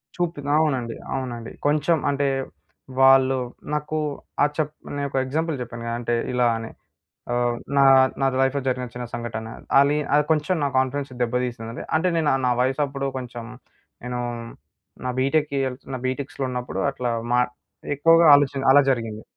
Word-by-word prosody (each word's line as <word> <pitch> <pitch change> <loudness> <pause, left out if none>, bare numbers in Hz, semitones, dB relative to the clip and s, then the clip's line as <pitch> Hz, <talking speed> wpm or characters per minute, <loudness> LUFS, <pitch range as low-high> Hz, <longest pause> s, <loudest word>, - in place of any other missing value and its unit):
చూపి 170 -4 -2 0.2
అవునండి. 130 -7 0 0.2
అవునండి. 120 -3 -5 0.2
కొంచెం 155 +3 +2
అంటే 140 0 0 0.8
వాళ్ళు 135 0 +6 0.4
నాకు 150 +1 -2 0.5
ఆ - - +7
చప్ 155 -1 -1 0.2
నేను 140 0 -2
ఒక 135 - -3
ఎగ్జాంపుల్ 160 +4 -1
చెప్పాను 120 -1 -7
కదా! 115 - -2
అంటే 120 0 -1 0.2
ఇలా 125 -1 +3
అని. 115 0 -6 0.6
ఆహ్, 120 0 +1 0.2
నా 140 - +6 0.4
నా 135 - +3 0.2
లైఫ్‌లో 135 +1 +1
జరిగిన 125 -1 -1
చిన్న 125 0 -5
సంఘటన. 115 -1 -5 0.3
అలి 145 +2 +3 0.2
అది 150 0 +4
కొంచెం 155 +4 +1
నా - - +2
కాన్ఫిడెన్స్ 135 +1 -1
దెబ్బ 120 0 -1
తీసింది. 115 -1 -7
అంటే 170 +3 +1
నేను 155 -3 +2 0.2
నా 125 - +3
వయసాప్పుడు 135 +1 -1
కొంచెం, 120 -2 -7 0.6
నేను 125 0 -3 0.9
నా - - 0
బీటెకెళ్తున్న 135 -2 -1
బీటెక్స్‌లో 135 +1 -3
ఉన్నప్పుడు. 125 0 -3
అట్లా 125 -3 -2 0.2
మా 125 - +4 0.6
ఎక్కువగా 165 +3 +5
ఆలోచాన 140 -1 +2
అలా 145 - +8
జరిగింది. 115 -4 -2
135 Hz, 145 wpm, -23 LUFS, 125-145 Hz, 0.9 s, అలా